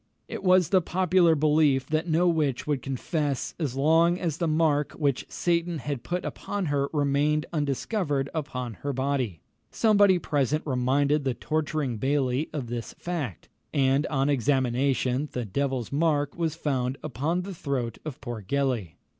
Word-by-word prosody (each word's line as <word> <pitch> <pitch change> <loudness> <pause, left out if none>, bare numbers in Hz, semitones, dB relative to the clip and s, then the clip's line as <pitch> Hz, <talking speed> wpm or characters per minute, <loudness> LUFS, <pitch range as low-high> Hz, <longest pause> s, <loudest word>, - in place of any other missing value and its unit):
It - - -6
was 185 -3 +4
the 190 -2 +4
popular 180 -1 +3
belief 150 -3 +3
that 155 +4 -1
no 170 +2 +3
witch 150 -7 +1
would 145 -4 -1
confess 140 +1 -2
as 145 -6 -2
long 165 +5 +3
as 165 -4 -2
the 170 - 0
mark 155 -2 +2
which 140 -4 -1
Satan 170 -1 0
had 145 -3 -4
put 180 +7 -3
upon 205 -2 -3
her 140 0 +1
remained 150 +1 +1
undiscovered 145 - -1
upon 125 -7 -4
her 140 0 -2
body. 130 - -1 0.3
Somebody 205 -4 +4
present 150 -2 0
reminded 140 +2 +1
the 130 -3 -1
torturing 150 -5 -2
bailie 135 +2 0
of 145 -5 -4
this 120 -1 -5
fact, 155 - -4 0.3
and 135 +1 +3
on 135 -2 0
examination, 130 0 +1
the 125 -2 -2
devil's 130 +3 -2
mark 145 -1 +1
was 165 -2 -1
found 135 -4 -1
upon 155 +6 -1
the 195 +1 -6
throat 135 -8 -3
of 155 -2 -6
poor 120 -5 -5
Gellie. 120 - -1
145 Hz, 155 wpm, -27 LUFS, 130-160 Hz, 0.3 s, was